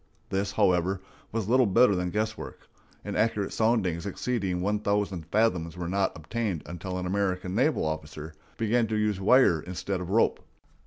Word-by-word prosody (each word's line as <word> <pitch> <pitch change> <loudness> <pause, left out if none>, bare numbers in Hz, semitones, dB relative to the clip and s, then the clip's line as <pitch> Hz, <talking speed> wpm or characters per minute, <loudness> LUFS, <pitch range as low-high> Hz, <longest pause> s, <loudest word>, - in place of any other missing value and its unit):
This, 100 +1 -1
however, 95 -2 +2 0.3
was 110 -3 -2
little 125 +1 +4
better 115 +3 +5
than 90 0 -1
guesswork; 110 +3 -4 0.4
and - - -4
accurate 105 -2 0
soundings 100 -6 +1
exceeding 100 -3 -2
one 105 +3 0
thousand 100 -5 -1
fathoms 90 -5 +1
were 85 -1 -4
not 95 0 0
obtained 95 +1 -3
until 90 +2 -5
an 90 - -3
American 95 -1 -1
naval 135 - +2
officer 80 0 -5 0.2
began 115 +1 +1
to 110 - -2
use 105 -2 0
wire 105 -5 +5
instead 90 +2 -4
of 90 - -6
rope. 110 +4 +2
100 Hz, 160 wpm, -27 LUFS, 90-110 Hz, 0.4 s, better